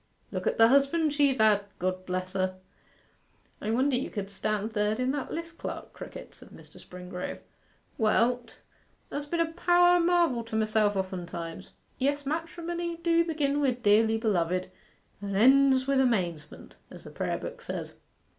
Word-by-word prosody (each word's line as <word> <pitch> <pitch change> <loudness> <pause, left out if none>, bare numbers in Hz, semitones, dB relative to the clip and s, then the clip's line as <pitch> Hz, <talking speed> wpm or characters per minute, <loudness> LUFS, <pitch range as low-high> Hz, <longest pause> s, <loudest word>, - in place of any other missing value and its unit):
Look - - -3
at - - 0
the 225 0 +7
husbands 280 +3 +3
she've 285 -2 +3
had 215 -2 +4
God 185 +1 -3
bless 185 0 -3
her!' 185 -1 -1 1.1
'I 210 - -3
wonder 260 +4 +2
you 250 - -2
could 205 -2 -5
stand 215 +2 -2
third 210 +1 0
in 255 +1 +1
that 280 -1 -4
list, 335 0 -6
Clerk - - -6
Crickett,' - - -10
said - - -13
Mr. - - -15
Springrove. 180 0 -7 0.6
'Well, 230 +3 +3
't 240 -2 -20 0.5
has 290 0 -4
been 340 +3 -2
a 330 -1 +1
power 350 +1 +4
o' - - +1
marvel 335 -8 +2
to 225 - -6
myself 215 -1 +2
oftentimes. 175 -3 -5 0.3
Yes, 285 +2 0
matrimony 335 +2 -3
do 335 0 +2
begin 290 -3 0
wi' 270 -3 +2
"Dearly 220 0 +4
beloved," 185 -5 0 0.5
and 200 -1 -4
ends 265 +3 +5
wi' 275 - +2
"Amazement," 175 - -2
as - - -12
the - - -11
prayer - - -2
book - - -8
says. - - -6
235 Hz, 165 wpm, -28 LUFS, 200-290 Hz, 1.1 s, the